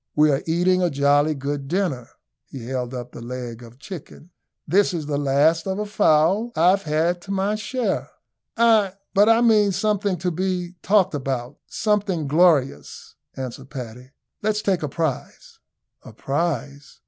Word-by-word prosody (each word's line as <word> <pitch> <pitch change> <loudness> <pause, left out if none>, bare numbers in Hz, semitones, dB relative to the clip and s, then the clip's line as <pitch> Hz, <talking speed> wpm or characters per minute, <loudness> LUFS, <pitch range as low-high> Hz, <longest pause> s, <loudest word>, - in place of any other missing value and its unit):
"We 150 0 +4
are 135 - 0
eating 180 +3 +2
a 175 - +2
jolly 145 +1 +2
good 140 0 -4
dinner." 165 -8 -2 0.4
He 130 -4 -9
held 125 -1 -3
up 125 -1 -7
the - - -10
leg 120 -1 -6
of 115 -1 -12
a - - -25
chicken. 170 +2 -11 0.4
"This 185 +3 +2
is 160 -3 -4
the 145 -1 -2
last 145 +5 +2
of 190 0 -2
a 210 - -2
fowl 205 +2 +2
I've 180 +4 +4
had 165 +3 0
to 195 - -8
my 195 +1 0
share." 225 +4 -2 0.5
"Ay, 220 -4 +4 0.2
but 205 +2 +5
I 225 +1 +5
mean 215 -4 +4
something 200 0 0
to 180 +2 -2
be 180 0 -2
talked 190 -3 +3
about 130 -3 -4
something 200 -7 -1
glorious," 145 - +1 0.2
answered 130 0 -7
Paddy. 125 -2 -8 0.3
"Let's 215 0 -1
take 190 -3 +1
a 150 - -3
prize." 155 -3 -4 0.4
"A - - -13
prize! 145 -2 -3
165 Hz, 160 wpm, -22 LUFS, 135-195 Hz, 0.5 s, but